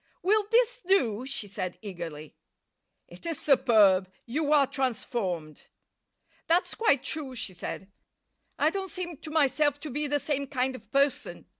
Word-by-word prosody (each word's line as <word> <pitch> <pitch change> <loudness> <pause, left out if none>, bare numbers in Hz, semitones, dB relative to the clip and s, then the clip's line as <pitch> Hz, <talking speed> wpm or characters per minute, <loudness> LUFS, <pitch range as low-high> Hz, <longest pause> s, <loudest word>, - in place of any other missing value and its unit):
"Will 415 +2 +3
this - - +3
do?" 255 - +2
she 275 -6 -3
said 190 -2 -5
eagerly. 170 -6 -7 0.7
"It - - -14
is 330 -4 -2
superb. 205 -9 +4
You 290 +5 -1
are 290 -2 +6
transformed." 220 - -3 0.8
"That's 340 +2 +2
quite 285 - +2
true," 280 -3 -4
she 225 -5 -4
said. 190 +2 -6 0.7
"I 305 +2 +3
don't 385 0 -4
seem 350 -4 -5
to 315 - -8
myself 290 -1 +2
to 305 - -6
be 295 +3 -1
the 290 +1 +1
same 285 -1 -2
kind 260 -1 -1
of 220 -3 -14
person. 280 0 0
275 Hz, 150 wpm, -28 LUFS, 215-310 Hz, 0.8 s, are